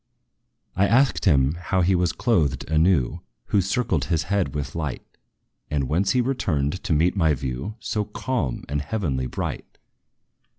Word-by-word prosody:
I 100 +2 +3
asked 130 +4 +3
him 70 -5 +4
how 95 +1 0
he 90 +2 +3
was 90 -2 +2
clothed 75 - 0
anew 80 -4 +2 0.3
Who 100 - +3
circled 95 - 0
his 80 -2 0
head 90 -7 -1
with 70 -1 -3
light 75 -6 -4 0.6
And 70 -3 0
whence 90 - +1
he 125 - +3
returned 90 - -1
to - - +1
meet 85 +5 +2
my 80 -6 +3
view 65 +9 -4
So 105 -2 -2
calm 105 - -3
and 75 +1 -1
heavenly 70 -7 -2
bright. - - -5
85 Hz, 155 wpm, -24 LUFS, 70-100 Hz, 0.6 s, him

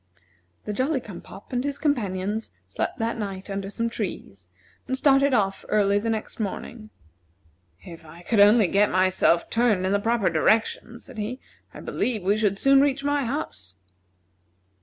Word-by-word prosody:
The 210 - -3
Jolly 265 +6 0
cum 205 -8 -10
pop 200 - -13
and 245 0 0
his 285 0 -3
companions 215 -7 -1 0.2
slept - - -3
that 230 0 -2
night 195 -1 -5
under 195 0 -4
some 230 +3 -2
trees, 135 - -6 0.4
and 260 - -1
started 275 0 +4
off 195 -5 0
early 205 -1 +3
the 230 +2 -3
next 220 0 -3
morning. 215 +2 -5 0.9
"If 165 -1 -11
I 165 +2 -14
could 220 +3 0
only 210 +2 +6
get 200 +3 +3
myself 185 -2 +2
turned 225 -5 +2
in 190 - 0
the 200 - +2
proper 225 -3 +1
direction," 225 +7 +1
said 255 -3 -11
he, 230 +5 -4 0.3
"I - - -11
believe 225 -6 -2
we 200 +3 +2
should 205 -2 0
soon 275 +4 +5
reach 280 -1 +1
my 285 -1 0
house." 225 - -5
215 Hz, 165 wpm, -24 LUFS, 195-245 Hz, 0.9 s, only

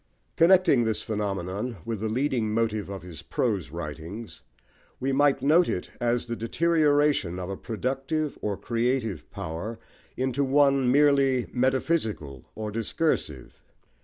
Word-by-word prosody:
Connecting 170 -7 +5
this 110 -2 -1
phenomenon 100 +1 -3
with 115 -3 -3
the 110 +1 -2
leading 120 -2 0
motive 110 -2 -1
of 95 -3 -6
his 85 -4 -9
prose - - -1
writings, 85 +7 -7 0.6
we 135 +1 0
might 135 -1 +3
note 165 +5 +4
it 90 - -3
as 120 0 +1
the 120 -1 -4
deterioration 145 - +2
of 90 +1 -4
a - - -3
productive 135 +8 -2
or 105 -2 -2
creative 120 -2 -1
power 100 +4 -5 0.4
into 130 +2 0
one 135 -2 +3
merely 140 -3 +4
metaphysical 125 - 0
or 110 -1 -4
discursive. 110 - -2
120 Hz, 130 wpm, -26 LUFS, 100-140 Hz, 0.6 s, Connecting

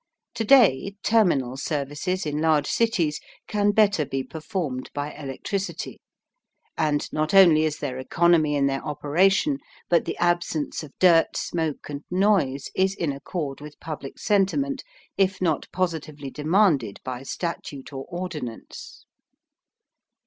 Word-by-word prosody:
To 225 - -2
day 205 - +5
terminal 145 - +2
services 150 +6 -2
in 150 0 -2
large 155 -2 +3
cities 175 -10 +1 0.3
can 205 -1 +1
better 205 -5 +3
be 135 -1 -3
performed 155 -5 -4
by 145 +1 -3
electricity, 150 +8 -5 0.7
and 150 -2 0
not 155 +4 0
only 165 -5 +7
is 155 -1 -1
there 130 0 -4
economy 160 +1 +3
in 140 -1 +2
their 135 0 -1
operation, 190 - +2 0.3
but 170 - +3
the - - -4
absence 175 -3 0
of 155 -3 -10
dirt, 170 -3 +4
smoke 160 -4 -3
and 145 0 -6
noise 180 -8 +1
is 190 +1 +1
in 165 -6 -1
accord 140 0 -5
with 150 0 -11
public 150 -4 -7
sentiment 265 +8 +1 0.4
if 190 -1 +2
not 165 -5 0
positively 155 -6 -3
demanded 150 - +2
by 130 -1 -5
statute 145 -2 -5
or 135 0 -6
ordinance. 170 -10 -7
160 Hz, 130 wpm, -25 LUFS, 145-190 Hz, 0.7 s, only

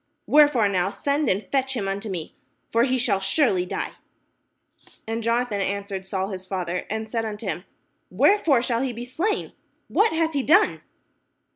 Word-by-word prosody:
Wherefore 290 -7 +5
now 190 -2 +1
send 285 +7 0
and 195 +3 0
fetch 265 -1 0
him 200 -3 -2
unto 200 +2 -3
me, 175 -5 -5 0.4
for 230 +1 +4
he 260 -1 +1
shall 230 -6 +1
surely 195 - +1
die." - - -3 1.1
And 225 +1 -3
Jonathan 230 -2 0
answered 195 -1 -3
Saul 190 0 -2
his 185 -2 -7
father, 180 -2 -3
and 220 +1 -3
said 225 +1 -2
unto 215 0 -5
him: 180 -2 -3 0.4
"Wherefore 280 - +3
shall 235 -1 0
he 265 -2 -1
be 235 +1 -6
slain? 345 - -2 0.4
what 435 +2 +3
hath 320 0 0
he 280 - +1
done?" 360 +10 +4
230 Hz, 165 wpm, -24 LUFS, 195-270 Hz, 1.1 s, Wherefore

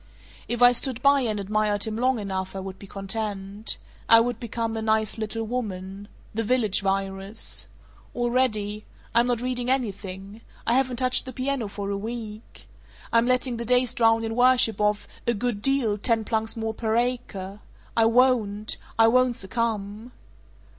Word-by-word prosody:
"If 240 0 0
I 245 - +9
stood 250 0 0
by 280 0 +5
and 215 -4 -1
admired 205 0 0
him 220 -1 -2
long 255 +2 +2
enough, 190 -2 -4
I - - -3
would 190 0 -7
be 200 - -11
content. 200 +1 -3 0.3
I 230 - +9
would 245 +1 0
become 230 -1 -3
a 220 - -2
'nice 220 0 +1
little 220 +1 -3
woman.' 200 -4 -5 0.3
The 225 - -1
Village 220 -3 +1
Virus. 195 +2 -2 0.5
Already 235 -4 0 0.3
I'm 235 +1 +4
not 240 -2 0
reading 250 -1 -2
anything. 200 -4 -3 0.2
I 235 - +2
haven't 255 -1 +1
touched 255 0 +1
the 260 - -6
piano 260 -3 -2
for 200 0 -5
a 200 - -1
week. 220 0 -7 0.5
I'm 230 +1 +4
letting 255 -1 +2
the 235 - -3
days 250 +1 +2
drown 225 -2 +3
in 225 0 -3
worship 245 -4 +4
of 210 0 +1 0.2
'a 235 - +2
good 215 -1 -2
deal, 240 -5 +1
ten 225 0 +1
plunks 220 +1 -1
more 220 0 -2
per 220 0 -1
acre.' 210 -5 -2 0.4
I 225 - +4
won't! 225 -3 +2 0.2
I 225 0 +6
won't 250 +1 +3
succumb! 220 +2 -3
225 Hz, 165 wpm, -25 LUFS, 205-245 Hz, 0.5 s, I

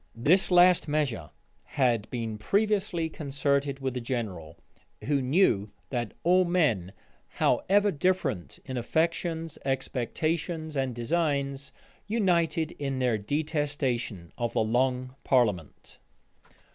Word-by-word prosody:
This 160 +12 +3
last 180 -1 +5
measure 140 - -1 0.3
had 120 -5 0
been 115 -3 -4
previously 200 - +1
concerted 140 -2 -1
with 130 -2 -2
the 125 - -3
general, 95 -10 -4 0.5
who 140 -1 +1
knew 130 - +2 0.2
that 120 -4 -3
all 180 +3 +5
men, 150 - +1 0.4
however 205 +1 +2
different 140 - -1
in 130 - -4
affections, 165 +4 -1
expectations, 155 +5 -2
and 135 -3 -1
designs, 140 0 -1 0.4
united 170 -7 +1
in 135 -2 -2
their 125 -4 +1
detestation 140 - -2
of 120 -1 -1
the - - +2
long 125 +3 0
parliament. 105 - 0
140 Hz, 105 wpm, -28 LUFS, 120-165 Hz, 0.5 s, last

